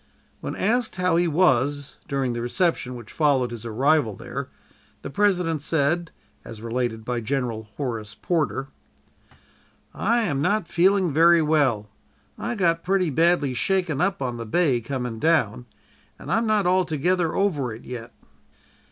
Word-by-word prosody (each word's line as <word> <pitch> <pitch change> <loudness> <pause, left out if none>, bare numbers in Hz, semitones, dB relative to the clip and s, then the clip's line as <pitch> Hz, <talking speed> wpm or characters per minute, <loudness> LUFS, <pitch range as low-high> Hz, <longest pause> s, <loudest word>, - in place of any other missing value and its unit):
When - - -5
asked 230 +3 0
how 180 -2 +1
he 175 +1 +3
was, 145 -4 +1
during 135 -3 -1
the 120 - -3
reception 125 0 0
which 120 - -10
followed 135 -6 +2
his 115 -1 -6
arrival 125 -1 +2
there, - - -6 0.5
the - - -6
President 180 -5 +1
said, 160 +3 0 0.3
as 115 -2 -9
related 115 -1 -3
by 120 -1 -2
General 115 -2 -2
Horace 115 -7 -4
Porter: 150 -5 -1 1.2
"'I 235 +4 +1
am 145 -9 -1
not 205 +3 +1
feeling 185 -1 +2
very 165 +2 +5
well. 140 -9 +2 0.5
I 240 - -4
got 170 -5 +1
pretty 185 -3 +1
badly 165 -2 +2
shaken 175 +1 0
up 195 -3 0
on 120 -2 -3
the 115 - -5
bay 135 -2 +2
coming 125 -1 -4
down, 125 -7 +1 0.5
and - - -8
am 225 +3 +2
not 215 -3 +2
altogether 180 -1 +1
over 150 - 0
it 110 +2 -10
yet.' 120 -2 -7
150 Hz, 145 wpm, -24 LUFS, 125-180 Hz, 1.2 s, very